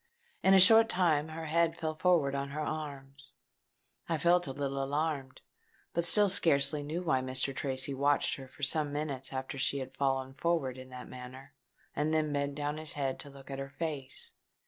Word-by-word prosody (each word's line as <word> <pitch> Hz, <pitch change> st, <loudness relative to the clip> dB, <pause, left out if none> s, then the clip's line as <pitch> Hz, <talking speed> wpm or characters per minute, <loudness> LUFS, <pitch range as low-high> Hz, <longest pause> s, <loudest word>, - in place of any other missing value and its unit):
In 190 Hz, 0 st, +5 dB
a -, -, +7 dB
short 225 Hz, +4 st, +8 dB
time 160 Hz, -5 st, +2 dB
her 160 Hz, +1 st, -7 dB
head 165 Hz, +1 st, +1 dB
fell 155 Hz, -1 st, -3 dB
forward 155 Hz, -4 st, +2 dB
on 140 Hz, 0 st, -3 dB
her 150 Hz, +2 st, -4 dB
arms. 140 Hz, -4 st, -7 dB, 0.8 s
I 165 Hz, -, +1 dB
felt 175 Hz, +1 st, +2 dB
a -, -, -3 dB
little 140 Hz, 0 st, -3 dB
alarmed; 140 Hz, -2 st, -3 dB, 0.5 s
but 170 Hz, 0 st, 0 dB
still 205 Hz, +4 st, +5 dB
scarcely 150 Hz, -5 st, +3 dB
knew 155 Hz, +5 st, -4 dB
why. 155 Hz, -7 st, +1 dB
Mr. 130 Hz, +1 st, -2 dB
Tracy 135 Hz, 0 st, -1 dB
watched 140 Hz, +2 st, +1 dB
her 135 Hz, -1 st, -10 dB
for 145 Hz, -, -14 dB
some 150 Hz, +1 st, +3 dB
minutes 145 Hz, -3 st, -3 dB
after 130 Hz, +1 st, -5 dB
she 140 Hz, -, +1 dB
had 130 Hz, -1 st, -7 dB
fallen 135 Hz, -1 st, -1 dB
forward 135 Hz, -5 st, -1 dB
in 130 Hz, 0 st, -11 dB
that 125 Hz, -1 st, -9 dB
manner, 130 Hz, +2 st, -11 dB, 0.4 s
and 150 Hz, +2 st, 0 dB
then 155 Hz, -2 st, 0 dB
bent 140 Hz, 0 st, -2 dB
down 145 Hz, +1 st, -3 dB
his 155 Hz, -1 st, +2 dB
head 135 Hz, -2 st, -2 dB
to 145 Hz, -, -6 dB
look 140 Hz, 0 st, -13 dB
at 135 Hz, -, -5 dB
her 135 Hz, 0 st, -6 dB
face. 140 Hz, -2 st, -6 dB
145 Hz, 190 wpm, -31 LUFS, 135-160 Hz, 0.8 s, short